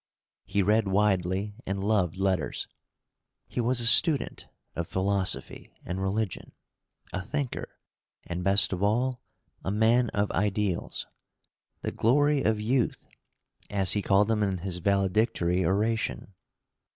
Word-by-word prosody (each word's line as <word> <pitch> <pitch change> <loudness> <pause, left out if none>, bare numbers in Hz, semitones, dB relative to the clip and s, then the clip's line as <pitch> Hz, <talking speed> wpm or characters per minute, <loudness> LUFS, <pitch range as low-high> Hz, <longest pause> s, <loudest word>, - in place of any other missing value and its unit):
He 100 - 0
read 105 +2 +2
widely 95 0 +1
and 95 0 -3
loved 100 -4 +1
letters. 95 -5 -1 0.8
He 125 - -2
was 120 +1 +1
a 120 - 0
student 140 +4 +3 0.3
of 85 -1 -3
philosophy 95 0 -1
and 95 +1 -4
religion, 100 +1 -2 0.6
a 100 - -2
thinker, 140 +6 -4 0.5
and, 85 +1 -4
best 100 +1 +4
of 90 - -4
all, 120 +5 +1 0.4
a - - -2
man 115 +4 +3
of 100 0 -1
ideals 100 -2 -1 0.8
"the - - -2
glory 145 +5 +2
of 110 -3 +1
youth," 120 +3 0 0.6
as 95 -3 0
he 105 - +1
called 100 +1 +3
them 110 -1 +1
in 100 -2 0
his 90 0 -4
valedictory 95 -1 +1
oration. 105 +1 -1
100 Hz, 125 wpm, -27 LUFS, 95-110 Hz, 0.8 s, best